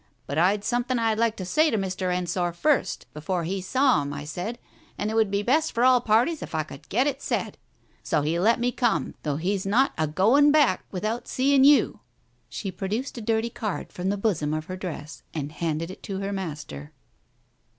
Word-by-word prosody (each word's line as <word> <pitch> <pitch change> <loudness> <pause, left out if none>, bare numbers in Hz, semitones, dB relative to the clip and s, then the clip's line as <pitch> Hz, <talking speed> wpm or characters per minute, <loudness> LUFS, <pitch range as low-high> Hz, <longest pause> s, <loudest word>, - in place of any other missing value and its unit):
But 140 +3 -2
I'd 200 +4 +3
some 245 +2 0
thing 255 0 -1
I'd 225 -1 +1
like 230 -1 +2
to 185 - -5
say 310 - +3
to 225 - 0
Mr. 185 -2 -2
Ensor 175 -1 -1
first 260 - +1
before 170 +4 -2
he 190 +3 -2
saw 255 - +3
him, 140 0 -4
I 145 0 -5
said, 180 +10 -4 0.4
and 215 - -2
it - - -3
would 220 -2 +3
be 200 +1 0
best 305 +8 +2
for 235 - +1
all 255 -1 +6
parties 245 +8 +2
if - - -6
I 155 - +1
could 140 -2 -13
get 245 +6 +2
it 290 - -1
said. - - -2 0.5
So 150 -3 0
he 160 +3 0
let 225 +6 +3
me 245 +1 +1
come, 240 -2 0
though 150 -2 -1
he's 185 +5 -1
not 235 +8 +2
a 155 - +2
going 235 - +4
back 290 -10 +3
without 215 +5 -3
seeing 270 +1 +3
you! 285 +1 +5 0.2
" - - -41
She 195 - -4
produced 210 +8 -3
a - - -6
dirty 225 +1 0
card, 215 -4 -4
from 180 +1 -2
the 205 - 0
bosom 165 -8 0
of 155 0 -4
her 185 - -5
dress, 165 -5 -7
and 145 -2 -3
handed 160 +2 -2
it - - -12
to 195 -2 -5
her 200 +1 -3
master. 150 - -6
195 Hz, 215 wpm, -25 LUFS, 170-240 Hz, 0.5 s, all